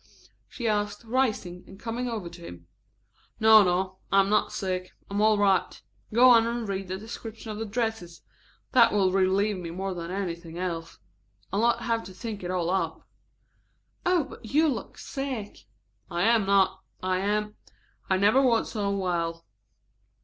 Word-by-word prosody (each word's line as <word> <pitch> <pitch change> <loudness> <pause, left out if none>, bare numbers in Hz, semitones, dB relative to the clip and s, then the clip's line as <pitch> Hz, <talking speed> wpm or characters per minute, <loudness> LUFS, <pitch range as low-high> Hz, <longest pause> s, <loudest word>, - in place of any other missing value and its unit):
she 235 - -4
asked, 205 0 -1
rising 220 -7 -1
and 195 - -13
coming 240 +2 -3
over 215 -6 -4
to 170 0 -11
him. 85 - -10 0.7
"No, 220 0 +8
no, 185 0 0
I 195 - +5
am 195 0 +3
not 215 - +2
sick. 185 -2 -3 0.2
I - - -5
am 205 - +1
all 215 0 +4
right. 195 -3 +2 0.3
Go 240 +4 +6
on 230 -1 +6
and 235 -1 -3
read 195 -1 -3
the 185 +1 -3
description 220 +1 -8
of 210 - -6
the 225 - -3
dresses; 220 -6 -3 0.5
that 240 -2 +6
will 195 -3 +2
relieve 195 +2 +2
me 175 -2 -6
more 190 +3 -3
than 170 -1 -6
anything 170 -3 -4
else. 170 -2 -4 0.6
I'll 200 - +1
not 235 +1 +2
have 230 -1 0
to 190 - -10
think 215 0 -6
it 175 - -4
all 180 -1 0
up." 190 - -2 1.0
"Oh, 355 -3 +3
but - - -12
you 300 +8 +2
look 230 -7 -5
sick." 255 - -6 0.4
"I 175 +1 -1
am 225 -2 +3
not; 190 -1 +3 0.2
I 185 0 +1
am 210 +2 -1 0.5
I 190 - +3
never 210 +7 +4
was 235 -4 +2
so 205 -3 -1
well. 170 -4 -2
200 Hz, 170 wpm, -27 LUFS, 185-225 Hz, 1.0 s, No